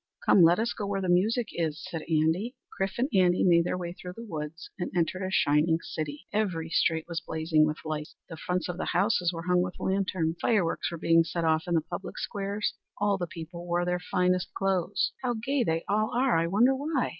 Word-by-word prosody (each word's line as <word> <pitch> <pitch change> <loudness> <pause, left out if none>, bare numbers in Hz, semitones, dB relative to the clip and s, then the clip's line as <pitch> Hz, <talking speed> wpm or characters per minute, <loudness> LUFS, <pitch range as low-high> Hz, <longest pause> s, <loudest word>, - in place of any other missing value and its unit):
"Come, 190 - +6
let 170 +1 +6
us 230 +2 0
go 205 - -4
where 200 -1 -1
the 185 -2 -2
music 215 +6 +2
is!" 160 -3 -2
said 165 -2 -3
Andy. 160 +9 +1 0.2
Chrif 195 0 -2
and 250 +3 +1
Andy 180 -2 +4
made 170 -2 +5
their 180 - -1
way 175 -1 -5
through 180 0 -9
the 230 - -7
woods 160 -3 -6
and 175 - -2
entered 180 +2 0
a 185 - -2
shining 160 -2 +3
city. 150 -3 -5
Every 175 -7 -1
street 160 -1 +2
was 165 -2 -3
blazing 160 -1 +2
with 155 +1 -2
lights; 155 -1 -4
the 165 - -8
fronts 180 +2 -2
of 180 -1 -4
the - - -2
houses 180 -2 +2
were 165 -1 -6
hung 180 0 +3
with 180 0 -4
lanterns; 185 -4 0
fireworks 205 -8 +1
were 170 - -5
being 165 0 +4
set 170 +1 -3
off 160 +1 +2
in 175 - +1
the 160 - +3
public 175 +4 -7
squares. 200 +1 -2 0.2
All 205 -1 +1
the 175 - -2
people 170 +1 -8
wore 175 0 +1
their 180 0 0
finest 180 0 0
clothes. 195 -1 0
"How 245 -2 -1
gay 255 +4 0
they 165 -4 0
all 215 +2 +1
are! 255 +1 +3
I 165 0 +2
wonder 235 +9 +4
why?" 285 -1 -1
180 Hz, 220 wpm, -28 LUFS, 165-200 Hz, 0.2 s, Come